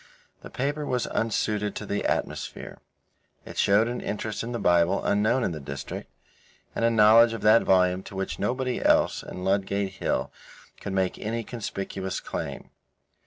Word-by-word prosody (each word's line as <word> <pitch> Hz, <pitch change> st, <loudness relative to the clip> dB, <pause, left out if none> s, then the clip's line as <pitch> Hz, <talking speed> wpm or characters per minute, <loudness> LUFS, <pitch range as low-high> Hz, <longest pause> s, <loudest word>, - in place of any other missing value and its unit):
The -, -, -10 dB
paper 145 Hz, +3 st, -2 dB
was 125 Hz, -4 st, -1 dB
unsuited 105 Hz, -2 st, -1 dB
to 105 Hz, -, -5 dB
the 100 Hz, 0 st, -2 dB
atmosphere. -, -, -3 dB, 0.7 s
It -, -, -7 dB
showed 100 Hz, +3 st, +4 dB
an 120 Hz, +1 st, -3 dB
interest 105 Hz, 0 st, -3 dB
in 115 Hz, -, -5 dB
the 120 Hz, -, -2 dB
Bible 85 Hz, -4 st, +2 dB
unknown 110 Hz, +5 st, +2 dB
in 95 Hz, -, 0 dB
the 80 Hz, -, -5 dB
district, 70 Hz, -1 st, -7 dB, 0.7 s
and -, -, -1 dB
a 115 Hz, -, +5 dB
knowledge 115 Hz, +1 st, +6 dB
of 115 Hz, -, -5 dB
that 110 Hz, +2 st, +6 dB
volume 90 Hz, 0 st, +3 dB
to -, -, -10 dB
which 95 Hz, 0 st, -3 dB
nobody 125 Hz, +4 st, -1 dB
else -, -, +3 dB
on 90 Hz, -, -8 dB
Ludgate 100 Hz, 0 st, 0 dB
Hill 95 Hz, -, -2 dB, 0.5 s
could 100 Hz, -, -5 dB
make 95 Hz, -1 st, 0 dB
any 115 Hz, +2 st, -3 dB
conspicuous 95 Hz, -4 st, -4 dB
claim. -, -, -6 dB
105 Hz, 165 wpm, -26 LUFS, 95-115 Hz, 0.7 s, knowledge